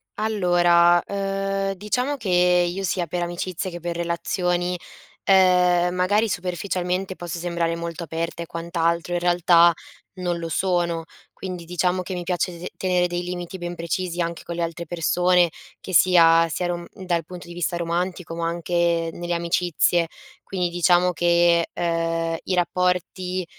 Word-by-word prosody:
Allora, 175 -5 +4
uhm, 195 0 -2
diciamo 250 +9 -2
che 220 -6 -5
io, 180 +1 +3
sia 175 -1 0
per 175 +2 -3
amicizia 175 +2 -3
che 175 0 -7
per 170 0 -4
relazioni, 175 +1 -1 0.5
ehm, 180 -2 +4
magari 205 +5 +2
superficialmente 185 0 -2
posso 175 -1 -6
sembrare 170 -1 -1
molto 170 0 -5
aperta 165 +1 -4
e - - -4
quant'altro, 170 +1 -1
in 175 - +1
realtà 175 -1 +5 0.4
non 175 -2 -3
lo 165 -1 -5
sono. 175 -2 0 0.3
Quindi, 180 -3 -7
diciamo 180 +1 0
che 180 +1 -5
mi 175 - -4
piace 175 0 -2
se 180 - -6
tenere 180 -1 +1
dei 175 0 -2
limiti 180 +1 -6
ben 175 0 -5
precisi 175 +1 -3
anche 170 0 -2
con 170 - -6
le 170 - -1
altre 170 0 -5
persone, 175 +1 +2 0.3
che 185 - -8
sia 165 -1 +6
sia 180 +3 -2
run 175 -1 -3
dal 175 -3 -2
punto 180 +1 -10
di 170 - -10
vista 175 0 -2
romantico, 175 0 -2
ma 165 0 -2
anche 170 0 0
nelle 175 0 -4
amicizie. 170 0 +1 0.3
Quindi, 180 -2 -2
diciamo 175 +1 +3
che, 170 0 +3
uhm, 165 -1 -1
i 190 - -2
rapporti 180 0 -1
175 Hz, 155 wpm, -23 LUFS, 170-180 Hz, 0.5 s, sia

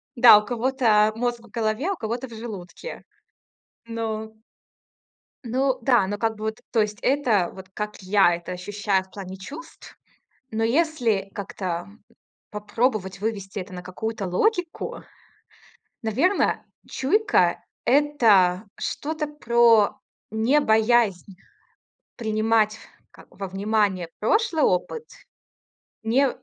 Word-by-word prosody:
Да, 235 -3 +9
у 210 - -8
кого-то, 235 -3 +2
а, - - -4
мозг 240 0 -1
в 235 - -17
голове, 230 - -1
у 395 - -1
кого-то 235 0 -4
в 235 - -13
желудке. 220 - -8 0.8
Ну 220 -1 -4 1.1
Ну 260 +2 0
да, 235 -6 +3
ну, 205 +1 -3
как 225 0 0
бы 215 0 -6
вот, 220 0 -3
то 225 - +3
есть 210 0 -2
это, 240 -10 +2
вот 190 -1 -11
как 210 -1 -5
я 185 -2 +4
это 175 +1 -8
ощущаю 195 +1 -1
в 190 - -25
плане 190 -1 -8
чувств. 295 - -11 0.5
Но 225 +1 -1
если 235 - +1
как-то 185 -3 -4 0.6
попробовать 210 -2 -1
вывести 205 -2 -3
это 185 +1 -8
на 180 - -7
какую-то 205 +2 -4
логику, 355 - -1 1.0
наверно, 270 - +1 0.2
чуйка- 415 +11 +2 0.2
это 225 -10 +4
что-то 310 +1 -3
про 235 -7 +3 0.3
не 225 +7 +2
боязнь 220 -6 +2 0.8
принимать, 220 -1 +1 0.3
как - - -17
во 195 -1 -6
внимание 195 -2 0
прошлый 345 - +2
опыт, 315 - 0 1.0
не 250 +5 +3
220 Hz, 120 wpm, -24 LUFS, 200-250 Hz, 1.1 s, Да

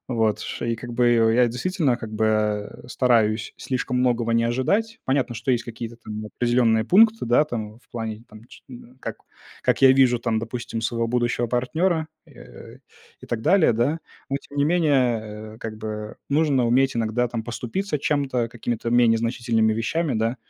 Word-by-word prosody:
Вот, 110 -4 0
что - - -5
и 115 - 0
как 120 +1 -8
бы 120 0 +3 0.3
я, 125 0 +5
действительно, 140 - 0
как 110 -3 -8
бы, 110 +1 +1
а, 105 -1 -1
э, - - -13
стараюсь 110 -4 +1
слишком 125 -1 -3
многого 120 -2 +1
не 115 0 +2
ожидать. 200 - 0
Понятно, 130 -2 0
что 115 +4 -2
есть 120 -1 0
какие-то 115 0 -7
там 110 -2 -7
определенные 120 -1 +2
пункты, 220 - +4
да, 120 +6 +4
там, 110 -6 -6
в 125 - -31
плане, 110 -2 -5
там, 110 +1 -14
ч - - -16
м, 125 0 -13
как - - -5 0.5
как - - +1
я 130 -1 +8
вижу, 130 -3 +4
там, 115 -2 -1
допустим, 115 0 -5
своего 115 0 -1
будущего 120 0 0
партнера, 160 +7 0 0.2
э, 60 -1 -14 0.4
и - - -10
так 115 -2 -3
далее, 185 - +4
да. 130 +9 0 0.3
Но 140 - -1
тем 140 0 -9
не 140 - +4
менее, 120 -10 0
э, - - -15
как 110 -2 -7
бы 105 0 -6
нужно 140 -4 +2
уметь 130 +1 +2
иногда, 115 +2 0
там, 115 -1 -4
поступиться 130 - -3
чем-то, 135 -5 0
какими-то 115 0 -4
менее 120 -2 +4
значительными 115 -1 +1
вещами, 135 +7 -1
да. 115 +3 0
120 Hz, 180 wpm, -23 LUFS, 115-130 Hz, 0.5 s, я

